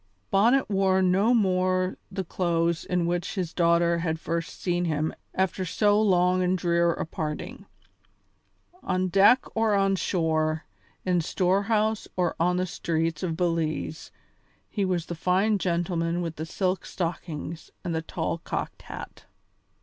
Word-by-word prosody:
Bonnet 235 Hz, +7 st, +4 dB
wore 190 Hz, -2 st, +2 dB
no 190 Hz, +5 st, +3 dB
more 185 Hz, -4 st, +2 dB, 0.2 s
the 190 Hz, 0 st, -3 dB
clothes 170 Hz, -2 st, 0 dB
in 180 Hz, -1 st, 0 dB
which 175 Hz, +3 st, -2 dB
his 180 Hz, -4 st, -3 dB
daughter 170 Hz, 0 st, +3 dB
had 160 Hz, -1 st, -1 dB
first 165 Hz, 0 st, -4 dB
seen 175 Hz, -1 st, 0 dB
him 155 Hz, -1 st, -1 dB, 0.2 s
after 190 Hz, 0 st, 0 dB
so 205 Hz, +4 st, +2 dB
long 185 Hz, -2 st, +3 dB
and 185 Hz, +1 st, +2 dB
drear 170 Hz, 0 st, +2 dB
a -, -, -3 dB
parting. 155 Hz, -2 st, -5 dB, 1.1 s
On 185 Hz, 0 st, 0 dB
deck 200 Hz, +7 st, +5 dB
or 225 Hz, -2 st, +2 dB
on 195 Hz, 0 st, +3 dB
shore, 160 Hz, -4 st, 0 dB, 0.4 s
in 180 Hz, -2 st, +2 dB
storehouse 205 Hz, +5 st, +1 dB
or 175 Hz, -2 st, +1 dB
on 180 Hz, +2 st, +2 dB
the 185 Hz, -, +1 dB
streets 165 Hz, -2 st, -2 dB
of 165 Hz, -3 st, -2 dB
Belize, 165 Hz, -2 st, -2 dB, 0.6 s
he 205 Hz, -, -1 dB
was 180 Hz, -3 st, 0 dB
the -, -, -5 dB
fine 190 Hz, +5 st, +2 dB
gentleman 175 Hz, -1 st, 0 dB
with 165 Hz, -1 st, -5 dB
the 160 Hz, +1 st, -4 dB
silk 185 Hz, +1 st, -1 dB
stockings 165 Hz, -2 st, -5 dB
and 175 Hz, -3 st, -2 dB
the 160 Hz, -, -1 dB
tall 165 Hz, 0 st, -3 dB
cocked -, -, -4 dB
hat. -, -, -9 dB
180 Hz, 145 wpm, -26 LUFS, 165-190 Hz, 1.1 s, deck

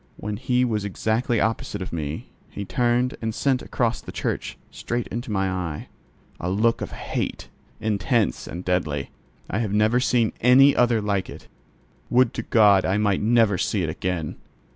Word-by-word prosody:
When 105 Hz, 0 st, -4 dB
he 125 Hz, +2 st, +1 dB
was 110 Hz, -4 st, -1 dB
exactly 110 Hz, +4 st, 0 dB
opposite 110 Hz, -1 st, -1 dB
to 95 Hz, -3 st, -6 dB
me, 75 Hz, -2 st, -4 dB, 0.2 s
he 100 Hz, -, -6 dB
turned 120 Hz, +6 st, +1 dB
and 110 Hz, -1 st, -2 dB
sent 135 Hz, -2 st, +1 dB
across 120 Hz, -1 st, -1 dB
the -, -, -9 dB
church -, -, -3 dB
straight 120 Hz, 0 st, -3 dB
into 120 Hz, 0 st, -5 dB
my 95 Hz, -2 st, +1 dB
eyes, 90 Hz, -5 st, -3 dB, 0.5 s
a 85 Hz, -, -2 dB
look 110 Hz, +5 st, +1 dB
of -, -, -3 dB
hate, -, -, -4 dB, 0.3 s
intense 110 Hz, +1 st, 0 dB
and 90 Hz, +3 st, -7 dB
deadly: 75 Hz, -6 st, -1 dB, 0.4 s
I 105 Hz, -, -2 dB
have 110 Hz, -4 st, -1 dB
never 110 Hz, +3 st, +3 dB
seen 120 Hz, -3 st, +2 dB
any 135 Hz, +4 st, +6 dB
other 120 Hz, -2 st, +3 dB
like 100 Hz, -2 st, -1 dB
it; -, -, -11 dB, 0.6 s
would 125 Hz, -1 st, +3 dB
to -, -, -3 dB
God 105 Hz, -4 st, +5 dB
I 95 Hz, +2 st, +1 dB
might 105 Hz, -2 st, +1 dB
never 110 Hz, -3 st, +3 dB
see 100 Hz, 0 st, 0 dB
it 80 Hz, -, -1 dB
again! 85 Hz, -1 st, -3 dB
105 Hz, 170 wpm, -24 LUFS, 95-120 Hz, 0.6 s, any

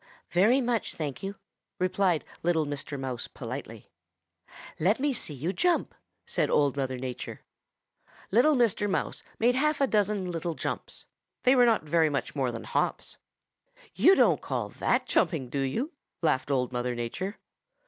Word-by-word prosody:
"'Very 220 Hz, +10 st, +4 dB
much, 240 Hz, -3 st, -1 dB
thank 145 Hz, -5 st, -4 dB
you,' 195 Hz, +1 st, -4 dB, 0.4 s
replied 185 Hz, -2 st, +1 dB, 0.2 s
little 165 Hz, -2 st, +2 dB
Mr. 145 Hz, 0 st, -5 dB
Mouse 130 Hz, -3 st, -4 dB
politely. 115 Hz, -3 st, -8 dB, 0.9 s
"'Let 195 Hz, +9 st, +3 dB
me 285 Hz, +1 st, +1 dB
see 155 Hz, -, -5 dB
you 160 Hz, +8 st, -2 dB
jump,' 355 Hz, -, +1 dB, 0.3 s
said -, -, 0 dB
Old 145 Hz, -2 st, +3 dB
Mother 130 Hz, -2 st, -2 dB
Nature. 125 Hz, -1 st, -6 dB, 0.9 s
"Little 250 Hz, +9 st, +5 dB
Mr. 220 Hz, -4 st, +2 dB
Mouse -, -, -1 dB, 0.2 s
made 240 Hz, +2 st, +3 dB
half 300 Hz, +4 st, +1 dB
a 275 Hz, -, +4 dB
dozen 205 Hz, -5 st, +1 dB
little 165 Hz, 0 st, -3 dB
jumps. -, -, -5 dB, 0.4 s
They 255 Hz, +1 st, +5 dB
were 245 Hz, -1 st, +6 dB
not 225 Hz, -8 st, +2 dB
much 155 Hz, -3 st, +1 dB
more 130 Hz, -3 st, 0 dB
than 115 Hz, -, -6 dB
hops. -, -, -1 dB, 0.8 s
'You 385 Hz, -, +6 dB
don't -, -, +4 dB
call -, -, -3 dB
that -, -, 0 dB
jumping, 135 Hz, -8 st, +1 dB
do 140 Hz, -, -1 dB
you?' 225 Hz, -, -1 dB, 0.3 s
laughed 135 Hz, -4 st, +1 dB
Old 130 Hz, -3 st, +1 dB
Mother 125 Hz, 0 st, -2 dB
Nature. 185 Hz, -, -4 dB
170 Hz, 150 wpm, -28 LUFS, 135-225 Hz, 0.9 s, were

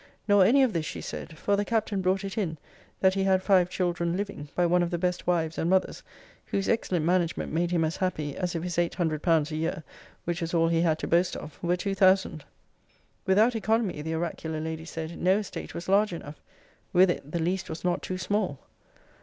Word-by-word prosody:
Nor 205 Hz, -2 st, +6 dB
any 270 Hz, +7 st, +5 dB
of 250 Hz, -5 st, +2 dB
this, 160 Hz, -3 st, -1 dB
she -, -, -5 dB
said; 160 Hz, -, -7 dB
for 200 Hz, +5 st, +1 dB
the 205 Hz, -, 0 dB
Captain 215 Hz, -2 st, -1 dB
brought 190 Hz, +2 st, +1 dB
it 195 Hz, 0 st, -5 dB
in, 175 Hz, -7 st, -2 dB, 0.4 s
that 190 Hz, -1 st, +5 dB
he 195 Hz, 0 st, 0 dB
had 190 Hz, -1 st, +2 dB
five 185 Hz, -3 st, +4 dB
children 175 Hz, -1 st, -1 dB
living, 195 Hz, -8 st, -5 dB
by 175 Hz, -, +3 dB
one 175 Hz, +1 st, +3 dB
of 175 Hz, -, 0 dB
the 175 Hz, -, -1 dB
best 180 Hz, 0 st, -2 dB
wives 165 Hz, -2 st, 0 dB
and 165 Hz, -, 0 dB
mothers, 190 Hz, 0 st, +1 dB, 0.5 s
whose 195 Hz, -, -1 dB
excellent 180 Hz, -8 st, 0 dB
management 175 Hz, -3 st, 0 dB
made 170 Hz, +2 st, +1 dB
him 170 Hz, -2 st, +1 dB
as 160 Hz, -, -3 dB
happy 155 Hz, -6 st, -2 dB
as 180 Hz, -2 st, -2 dB
if 165 Hz, -, -2 dB
his 175 Hz, -1 st, -2 dB
eight 170 Hz, -1 st, 0 dB
hundred 160 Hz, -4 st, -1 dB
pounds 165 Hz, -3 st, +2 dB
a -, -, -3 dB
year 160 Hz, 0 st, -2 dB, 0.4 s
(which 175 Hz, +1 st, -2 dB
was 165 Hz, +1 st, -2 dB
all 165 Hz, 0 st, +3 dB
he 165 Hz, 0 st, +2 dB
had 160 Hz, -2 st, +2 dB
to -, -, -4 dB
boast 175 Hz, +2 st, +2 dB
of) 150 Hz, -, -10 dB
were 175 Hz, +1 st, +1 dB
two 195 Hz, +2 st, -2 dB
thousand. 185 Hz, -5 st, +3 dB, 0.8 s
Without 215 Hz, +6 st, +4 dB
economy, 220 Hz, -6 st, 0 dB
the 160 Hz, +2 st, -3 dB
oracular 160 Hz, -1 st, -3 dB
lady 160 Hz, 0 st, -4 dB
said, 165 Hz, 0 st, -6 dB
no 185 Hz, +2 st, +4 dB
estate 210 Hz, -2 st, -6 dB
was 170 Hz, -, -6 dB
large 200 Hz, 0 st, +3 dB
enough. 150 Hz, -3 st, -8 dB, 0.5 s
With 185 Hz, 0 st, +6 dB
it, 150 Hz, -3 st, -6 dB
the 170 Hz, -, -1 dB
least 180 Hz, +3 st, -1 dB
was 160 Hz, -, -6 dB
not 180 Hz, 0 st, 0 dB
too 185 Hz, -, -4 dB
small. 190 Hz, -5 st, -1 dB
175 Hz, 220 wpm, -27 LUFS, 165-190 Hz, 0.8 s, Nor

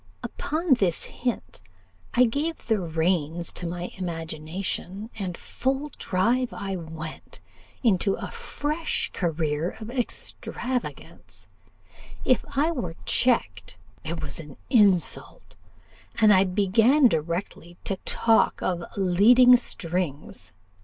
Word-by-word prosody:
Upon 320 Hz, -1 st, 0 dB
this 190 Hz, -9 st, +1 dB
hint, 245 Hz, -2 st, -4 dB, 0.5 s
I 250 Hz, -, +6 dB
gave 295 Hz, +8 st, -2 dB
the 220 Hz, -3 st, +1 dB
reins 165 Hz, -1 st, 0 dB
to 175 Hz, -, -5 dB
my 175 Hz, +1 st, -5 dB
imagination, 175 Hz, +4 st, -4 dB
and 185 Hz, -3 st, -4 dB
full 270 Hz, +3 st, -2 dB
drive 235 Hz, +7 st, +1 dB
I 195 Hz, -1 st, -4 dB
went 160 Hz, -2 st, -8 dB, 0.4 s
into 195 Hz, -3 st, +3 dB
a -, -, -7 dB
fresh 305 Hz, +3 st, -3 dB
career 160 Hz, -2 st, -1 dB
of 220 Hz, +2 st, -7 dB
extravagance: 250 Hz, 0 st, -5 dB, 0.8 s
if 255 Hz, -, +3 dB
I 305 Hz, +4 st, +3 dB
were 175 Hz, -, -4 dB
checked, 95 Hz, -, +1 dB, 0.3 s
it 165 Hz, +1 st, -4 dB
was 140 Hz, +1 st, -3 dB
an 150 Hz, -4 st, -10 dB
insult, 200 Hz, -, +2 dB, 0.6 s
and 215 Hz, -2 st, +7 dB
I 190 Hz, 0 st, +5 dB
began 220 Hz, +9 st, +4 dB
directly 170 Hz, 0 st, -3 dB
to 195 Hz, -, -2 dB
talk 225 Hz, +4 st, +3 dB
of 175 Hz, -2 st, -1 dB
leading 220 Hz, +7 st, +6 dB
strings. 175 Hz, -, -4 dB
190 Hz, 110 wpm, -25 LUFS, 170-245 Hz, 0.8 s, and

